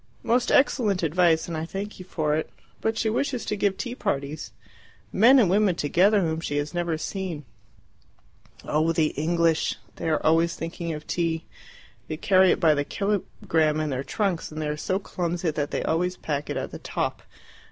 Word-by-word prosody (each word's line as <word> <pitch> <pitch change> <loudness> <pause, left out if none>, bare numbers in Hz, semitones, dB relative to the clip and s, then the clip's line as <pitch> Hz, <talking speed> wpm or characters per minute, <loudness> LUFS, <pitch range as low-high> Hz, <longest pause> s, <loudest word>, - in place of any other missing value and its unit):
"Most 240 +1 +2
excellent 215 -9 +3
advice, 165 0 +3
and 170 - -4
I 155 - -2
thank 195 +5 -6
you 185 - -8
for 155 -4 -1
it. 155 - -2 0.3
But 220 0 0
she 225 - 0
wishes 250 +3 -1
to - - -1
give 200 -1 0
tea 245 -2 -4
parties 145 - -3 0.6
men 240 +7 +7
and 235 -7 +5
women 195 0 +3
together 190 +7 +3
whom 160 -2 -1
she 145 -3 -3
has 145 +2 -2
never 170 -2 -1
seen." 170 -4 -4 1.2
"Oh, 160 +2 +1
the 155 -2 +2
English! 165 +1 +1 0.2
they - - -2
are 155 - 0
always 165 +1 +3
thinking 165 0 -4
of 150 0 -7
tea. 165 -2 -1 0.6
They 155 - -4
carry 190 +2 +4
it - - +2
by 160 -4 +5
the 145 -1 0
kilogramme 165 -5 0
in 155 -1 -1
their 130 0 -2
trunks, 190 -2 -2
and 155 - -6
they 155 -1 -2
are 150 - -1
so 185 +5 -1
clumsy 175 -3 -2
that 145 -1 -2
they - - -2
always 180 +3 0
pack 145 -1 -3
it - - -2
at - - -4
the - - -7
top. - - -3
170 Hz, 190 wpm, -25 LUFS, 155-195 Hz, 1.2 s, men